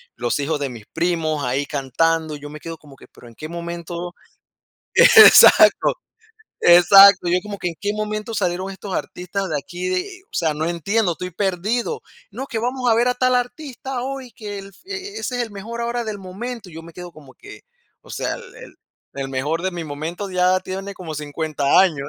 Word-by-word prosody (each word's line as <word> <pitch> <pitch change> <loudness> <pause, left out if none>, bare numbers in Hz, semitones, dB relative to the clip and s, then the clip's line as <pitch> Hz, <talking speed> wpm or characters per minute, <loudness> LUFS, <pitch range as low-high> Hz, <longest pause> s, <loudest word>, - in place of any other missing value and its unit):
los 120 +4 -2
hijos 150 +1 -1
de 140 -2 -2
mis 115 -4 -11
primos, 160 -4 -1
ahí 130 +3 -1
cantando, 155 +3 0
yo 145 0 -9
me 150 +1 -10
quedo 165 0 -8
como 145 -3 -16
que, - - -16
pero 120 - -15
en 115 - -16
qué 155 - -7
momento 170 +1 -6 0.8
Exacto, 445 -3 +8 0.7
exacto, 180 +2 +8
y 175 - +1
yo 180 - +3
como 205 0 -7
que, 175 - -2
¿en 165 - -9
qué 205 0 0
momento, 215 +1 -4
salieron 185 0 -1
estos 195 0 -8
artistas 190 +1 -4
de 150 - -1
aquí, 175 +5 -6
de? 370 - -3
O - - -47
sea, 160 -3 +1
no 155 +2 -3
entiendo, 180 +4 0
estoy 180 +2 -6
perdido. 205 - -2 0.3
No, 265 - -6
que 225 - -3
vamos 250 +1 -1
a - - +5
ver, 240 +2 +2
a 250 - +2
tal 255 0 +2
artista 255 0 -4
hoy, 265 -2 -6
que 205 -5 -7
el, 195 - -10 0.2
e 400 - -7
e 395 0 -6
ese 250 - -3
es - - 0
el 225 - -8
mejor, 225 +4 -7
ahora 235 0 -2
del 215 -2 -5
momento, 200 +2 -7
y - - -15
yo 165 - -7
me 165 -1 -13
quedo 180 -1 -9
como 145 -4 -16
que, 410 - -13 0.4
o - - -14
sea, - - -3
el 480 - -11
el - - -13 0.4
el 135 -1 -4
mejor 145 +6 -2
de 190 0 -1
mi 170 -1 -5
momento, 160 +7 -5
ya 185 0 +2
tiene 195 +2 -6
como 170 -4 -8
50 150 0 0
años. 150 -7 0
180 Hz, 210 wpm, -21 LUFS, 160-220 Hz, 0.8 s, Exacto